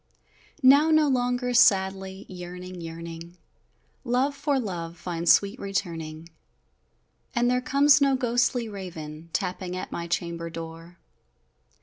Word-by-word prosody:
Now 280 +4 +7
no 310 -1 +4
longer 250 -1 0
sadly 190 -3 +3
yearning 180 0 -8
yearning 165 +1 -8 0.7
Love 260 +3 +1
for 280 -1 0
love 175 -7 -5
finds 170 -1 +1
sweet 200 +5 +3
returning 165 -5 -4 1.1
And 240 0 +2
there 250 0 +1
comes 280 +3 +4
no 275 -1 +4
ghostly 245 -1 +1
raven, 170 -6 -8
Tapping 180 +1 -3
at - - -6
my 170 0 -4
chamber 170 -1 -3
door! 165 +1 -9
190 Hz, 115 wpm, -26 LUFS, 170-250 Hz, 1.1 s, Now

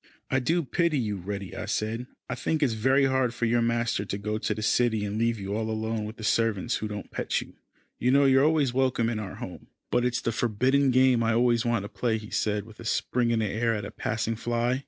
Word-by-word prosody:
"I 130 - +3
do 165 +7 +1
pity 170 +2 +1
you, 105 -5 -1
Reddy," 100 +1 -5
I - - -4
said. 115 +3 -2 0.2
"I - - -3
think 150 +5 -1
it - - +6
is 120 - 0
very 130 +5 +3
hard 130 -3 +1
for 120 - 0
your 120 +1 +2
master 115 -3 0
to 100 0 -4
go 105 +1 -3
to 105 - -1
the 110 - -4
city, 110 -2 +2
and 105 +2 -3
leave 115 -1 +1
you 100 +1 -3
all 110 0 -2
alone 110 0 -2
with 110 +1 -8
the 110 - -9
servants 115 0 +1
who 110 - -3
don't 105 -1 -7
pet - - -1
you. - - -9 0.5
You 125 - +1
know 140 +2 +5
you 135 -1 +5
are - - +4
always 150 -5 +2
welcome 130 -3 +1
in 110 - -2
our 100 -3 -6
home." - - -8 0.2
"But 120 - +2
it's 125 -1 0
the 115 - -1
forbidden 130 +5 +2
game 130 -1 +4
I 115 0 +2
always 120 0 +3
want 120 -4 +1
to - - -5
play," 115 0 -1
he 110 -1 -10
said, 105 -1 0
with 110 -1 -15
a - - -8
spring 120 +1 0
in 115 - +2
the - - +1
air 115 +2 0
at 105 -1 -4
a 105 - -7
passing 115 -2 -2
fly. 120 +2 0
115 Hz, 260 wpm, -27 LUFS, 110-125 Hz, 0.5 s, it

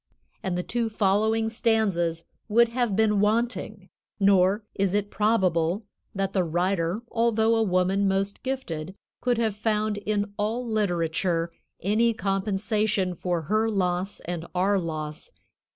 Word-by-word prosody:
And 185 -2 -2
the 180 - -1
two 235 +2 -1
following 220 +2 +2
stanzas 205 -8 0 0.2
would 235 +2 +5
have 235 -4 0
been 210 -1 +3
wanting; 215 -2 -1 0.3
nor 195 +1 +4
is 195 0 0
it 205 0 -1
probable 190 -3 +1 0.3
that 195 0 -1
the 185 - +2
writer, 175 +4 0
although 230 -1 +2
a 225 - +2
woman 190 0 +2
most 195 +1 -1
gifted, 190 -10 -4 0.3
could 245 -1 +1
have 220 -3 0
found 215 0 0
in 205 0 -2
all 225 +4 -1
literature 175 -5 0 0.3
any 225 +4 +2
compensation 200 -1 0
for 175 -1 -2
her 215 +7 +1
loss 185 -1 -1
and 170 -1 -5
our 195 +2 +2
loss. 155 - -5
200 Hz, 135 wpm, -26 LUFS, 180-220 Hz, 0.3 s, would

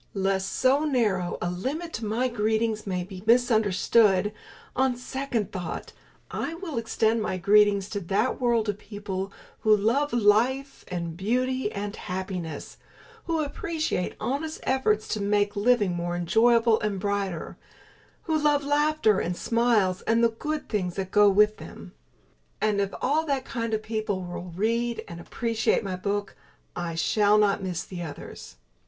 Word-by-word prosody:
Lest 195 0 0
so 270 +3 +3
narrow 215 - 0
a 175 - -1
limit 290 - -4
to 220 - -4
my 230 +5 0
Greetings 220 -2 0
may 180 -2 -1
be 185 0 -9
misunderstood, 215 -3 +3 0.4
on 260 -1 +2
second 250 -4 -3
thought 180 -4 -5 0.4
I 330 - -3
will 330 -8 -4
extend 225 0 +1
my 190 - -2
Greetings 200 +1 +4
to 205 - -3
that 200 +8 -1
world 235 -3 +2
of 205 -1 -2
people 200 -2 -5 0.3
who 215 -1 +4
love 245 +8 +1
life 240 +5 +2
and 170 -2 -4
beauty 250 +5 0
and 205 0 -4
happiness; 180 -5 -5 0.5
who 330 -2 0
appreciate 310 - -2
honest 310 +4 -3
effort 255 -5 +2
to 215 -1 -4
make 205 0 +1
living 205 -3 +3
more 175 0 -2
enjoyable 225 +6 +3
and 210 -2 -2
brighter; 200 -4 -2 0.7
who 320 - -1
love 295 -1 +2
laughter 290 -7 +2
and 175 +1 -2
smiles 230 -6 +2
and 230 +1 +3
the 230 - +5
good 300 +7 -4
things 185 -5 -2
that 190 -1 -4
go 210 -1 +6
with 210 +2 +4
them. 85 +1 -11 0.7
And 210 -2 +1
if 200 0 -1
all 300 +4 +2
that 275 -2 -1
kind 230 -2 -3
of 215 - -4
people 215 -3 -2
will 175 0 -7
read 230 +4 0
and 170 0 -8
appreciate 225 +5 0
my 190 -2 -3
book, 200 +2 -3 0.4
I 170 -1 -3
shall 205 +5 +3
not 205 -1 +3
miss 180 -3 -3
the 180 -2 -7
others. 155 - -8
210 Hz, 155 wpm, -26 LUFS, 190-245 Hz, 0.7 s, go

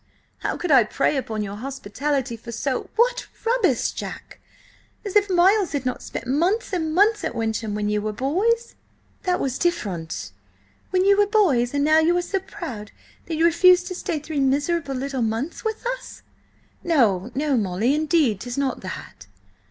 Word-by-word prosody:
How - - -2
could 355 - -2
I 260 -4 +7
prey 275 +7 0
upon 225 -5 -2
your 200 0 -6
hospitality 270 +1 -3
for 235 +1 -10
so—" 255 +3 -2
"What - - +2 0.2
rubbish, 450 - +2
Jack! - - -8 0.7
As 400 - -5
if 410 -1 +4
Miles 375 +1 +3
had 280 -3 -2
not 255 - -2
spent - - -6
months 345 - 0
and 320 -3 -1
months 420 +3 +4
at - - -3
Wyncham 220 -2 -2
when 210 0 -1
you 210 0 0
were 215 +1 -2
boys—" 385 - 0 0.5
"That 360 -1 +1
was 260 -2 -2
different—" 195 - -2 0.6
"—when 370 0 +2
you 400 +1 +5
were 410 - +4
boys, 285 - +2
and 285 - +2
now 310 +1 +5
you 340 +2 +3
are - - +2
so 390 +2 -1
proud 335 - -7 0.4
that 325 - -2
you 325 +2 +2
refuse 360 +2 +6
to 365 - -5
stay 350 -2 -3
three 300 0 -4
miserable 280 +2 0
little 265 0 -3
months 225 +8 -2
with 440 +1 -3
us—" - - -5 0.6
"No, 230 - +2
no, 290 0 +1
Molly; 215 +3 +1
indeed, 300 - +2
'tis 245 +4 -6
not 275 -2 -1
that!" - - -8
290 Hz, 175 wpm, -23 LUFS, 240-365 Hz, 0.7 s, I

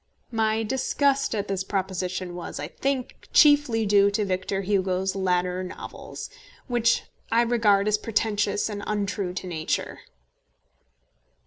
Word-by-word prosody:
My 220 -1 +1
disgust 270 +2 +1
at 205 - -2
this 195 -1 -1
proposition 185 -2 -3
was, 175 -1 -6
I 150 +2 -4
think, 270 +4 -3
chiefly 290 -7 +5
due 200 0 +5
to 205 +1 0
Victor 190 +1 -1
Hugo's 190 -1 0
latter 180 -1 0
novels, 185 - -8 0.4
which 240 -2 +2 0.3
I 230 +1 +4
regard 215 -4 +3
as 210 0 +2
pretentious 210 -2 0
and 205 -2 -5
untrue 200 -3 -2
to 185 - -4
nature. 160 -3 -2
205 Hz, 125 wpm, -25 LUFS, 185-225 Hz, 0.4 s, chiefly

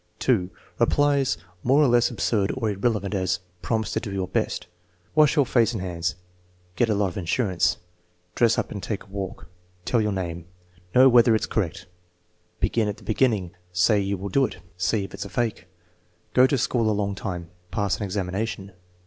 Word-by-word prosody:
(2) 100 -9 +1 0.3
Replies 140 -2 +2 0.2
more 135 +7 +4
or - - +5
less 120 -1 +4
absurd 110 -4 0
or 115 -4 0
irrelevant; 100 0 -1
as: 95 -2 0 0.2
"Promise 110 +5 -1
to - - 0
do 110 -3 -6
your 95 -2 -2
best." 90 0 -1 0.5
"Wash 150 0 +5
your 145 -3 +4
face 120 -2 +2
and 110 - -3
hands." 90 -1 -2 0.6
"Get 120 +3 +2
a 105 - +2
lot 100 -1 +1
of 90 - -9
insurance." 90 -1 +1 0.6
"Dress 115 -1 +3
up - - -1
and 100 - -5
take 105 0 -4
a 100 - -20
walk." 95 -2 -6 0.4
"Tell 120 - +2
your 105 -1 0
name." 85 -3 -4 0.5
"Know 130 +1 +8
whether 120 -2 +6
it's 110 - 0
correct." 95 -6 -2 0.7
"Begin 115 -2 +1
at 105 - -3
the - - -16
beginning." 110 -6 +1 0.2
"Say 90 +4 +3
you 100 0 -1
will 100 +2 -5
do 135 +8 +3
it." - - -11 0.2
"See 90 +4 0
if 95 - -8
it's - - -5
a - - -8
fake." 115 -6 -2 0.7
"Go 130 +1 +6
to 140 - +1
school 120 -2 +1
a - - +2
long 100 -1 -1
time." 90 -4 -5 0.2
"Pass 100 +1 0
an - - -4
examination." 100 +1 -3
105 Hz, 190 wpm, -25 LUFS, 95-120 Hz, 0.7 s, Know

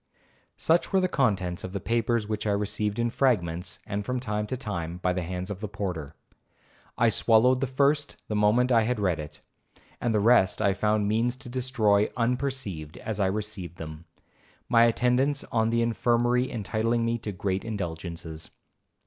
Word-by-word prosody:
'Such 165 +2 +2
were 190 - +4
the 185 - +2
contents 95 - 0
of 95 - -6
the 100 - -2
papers 115 +1 0
which 110 0 -3
I - - +2
received 105 +1 -1
in 120 0 0
fragments, 90 -10 0
and 105 -1 -3
from 125 +4 -2
time 105 -3 -2
to 130 - -3
time, 90 -8 -4
by 90 0 0
the 90 - -2
hands 90 +3 -4
of 100 - -5
the 105 - -4
porter. 90 -7 -5 0.8
I 115 0 +4
swallowed 120 +4 +4
the 135 - +1
first 140 +3 +1
the 105 - -2
moment 110 +5 +3
I 115 -2 +5
had 115 +1 0
read 90 -6 +1
it, 75 -1 -8 0.6
and 120 - +1
the 110 - +2
rest 105 -3 +4
I 100 -2 +3
found 105 +1 +1
means 115 +4 +1
to 130 -1 -11
destroy 120 -5 +2
unperceived 120 - -2
as 110 -2 -5
I 95 - +3
received 95 -4 -4
them,—my 80 +8 -2
attendance 125 +4 +2
on 110 -1 +2
the 115 0 +2
infirmary 120 +2 +1
entitling 115 +2 0
me 115 0 0
to 105 - -5
great 95 0 -2
indulgences.' 85 -6 -5
110 Hz, 175 wpm, -27 LUFS, 95-120 Hz, 0.8 s, I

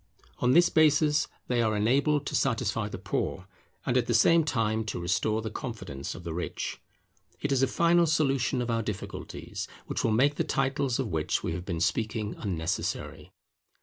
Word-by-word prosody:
On 125 0 +3
this 175 +1 +6
basis 150 -1 +4 0.2
they 120 -1 +1
are 110 -2 +1
enabled 140 +7 +2
to - - -4
satisfy 115 -4 0
the 100 - -6
Poor, 95 0 -3 0.4
and 125 - 0
at 125 -2 +2
the 120 - +2
same 165 +9 +5
time 110 -6 0
to 105 - -3
restore 105 +6 0
the 110 - -4
confidence 105 - -6
of 85 - -9
the 85 -1 -4
Rich. 90 +2 -4 0.6
It 145 - -2
is 135 -1 +2
a 135 - +4
final 170 +2 +3
solution 135 -5 +1
of 120 - -2
our 115 0 +1
difficulties 105 -3 -6 0.2
which - - -3
will - - +2
make 135 +7 +3
the - - +2
titles 135 -2 0
of 130 -5 -2
which 80 -3 -1
we - - -1
have 90 +1 -5
been 85 -4 -3
speaking 105 +4 -1
unnecessary. 85 -5 -3
115 Hz, 180 wpm, -28 LUFS, 105-140 Hz, 0.6 s, this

